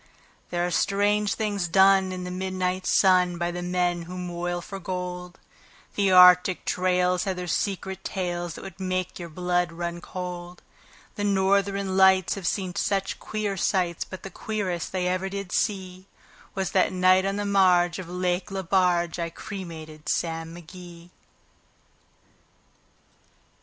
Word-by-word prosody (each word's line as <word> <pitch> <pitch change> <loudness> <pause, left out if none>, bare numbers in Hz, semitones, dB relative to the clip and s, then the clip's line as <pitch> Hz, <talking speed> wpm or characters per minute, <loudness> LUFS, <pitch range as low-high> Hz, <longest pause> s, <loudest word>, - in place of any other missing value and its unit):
There 175 0 0
are 180 - -2
strange 205 +2 +1
things 205 -4 -1
done 190 +1 +5
in 185 0 -5
the 180 - -5
midnight 185 0 -2
sun 180 -2 +4
By 175 0 -1
the 175 0 -5
men 175 -1 0
who 180 - -6
moil 175 0 -3
for 195 +3 -8
gold; 180 -1 -5 0.6
The 200 -2 +2
Arctic 180 0 +7
trails 180 0 +1
have 190 -1 -1
their 180 0 -5
secret 190 +1 -2
tales 175 -3 -3
That - - -9
would 190 0 -10
make 185 -1 -2
your 170 -1 -7
blood 180 +1 0
run 170 +1 -5
cold; 180 -1 -7 0.5
The 205 - -2
Northern 195 -1 +1
Lights 190 -1 +5
have 195 -4 -4
seen 185 -2 -1 0.5
queer 215 -2 -3
sights, 180 -2 0
But 185 - -10
the 195 - -7
queerest 190 -5 -3
they 185 -1 -1
ever 185 +1 -1
did 200 -2 -6
see 190 -3 -2 0.5
Was 190 -2 -2
that 190 - +3
night 185 0 +4
on 195 +1 -1
the 205 0 -2
marge 180 -3 +3
of 180 -2 -7
Lake 180 +1 -1
Lebarge 180 -3 +1
I 170 0 -2
cremated 165 -5 -8
Sam 165 0 -2
McGee. 175 0 -12
180 Hz, 145 wpm, -25 LUFS, 175-190 Hz, 0.6 s, Arctic